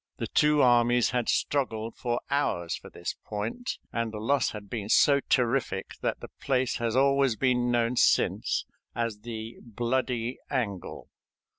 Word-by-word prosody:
The - - -3
two 150 -1 +3
armies 120 -1 +4
had 125 -2 -1
struggled 115 -5 -1
for 120 -1 -2
hours 85 -12 0
for - - -11
this - - -5
point, 110 - -4 0.2
and 115 -1 -1
the 110 - -6
loss 140 +7 +1
had 105 -1 -8
been 105 -1 -5
so 140 +4 +5
terrific 120 -7 0
that - - -2
the - - -8
place 130 -2 +1
has 115 -1 -1
always 135 -2 +3
been 125 0 +1
known 120 0 +1
since - - +2 0.3
as 115 -3 -2
the 110 0 -7
"Bloody 120 +1 -2
Angle." 105 -9 -3
120 Hz, 150 wpm, -28 LUFS, 110-130 Hz, 0.3 s, so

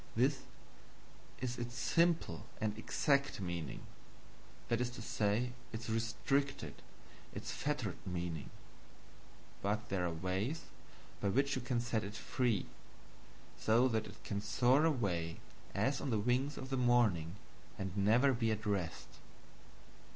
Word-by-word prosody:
This 130 +4 +3 1.0
is 125 -1 -2
its 120 +1 -4
simple 165 +5 +2
and 105 -1 0
EXACT 140 +5 +1
meaning 85 -5 -3 0.9
that 120 0 +1
is 125 - +1
to 120 - -9
say, 120 0 +1 0.2
its 110 0 -4
restricted, 135 +5 0 0.6
its - - -4
fettered 135 -10 -1
meaning; 85 -4 -3 1.1
but 105 +3 -1
there 90 -2 +1
are - - -1
ways 95 - -1 0.6
by 100 - +1
which 140 +6 +2
you 130 - -2
can 125 -1 0
set 120 -2 0
it 105 +2 -6
free, 120 -2 +1 0.9
so 115 +4 +5
that 110 -2 0
it 110 +2 -13
can 100 -1 -2
soar 130 +7 +4
away, 90 - 0 0.4
as 130 +7 +1
on 140 - -2
the 115 - +2
wings 125 +7 +1
of 130 +1 -6
the 135 - +1
morning, 110 -9 +3 0.4
and 95 -1 -4
never 115 +7 +5
be 115 -2 +1
at 110 +1 -1
rest. 95 -5 -1
115 Hz, 135 wpm, -36 LUFS, 100-130 Hz, 1.1 s, so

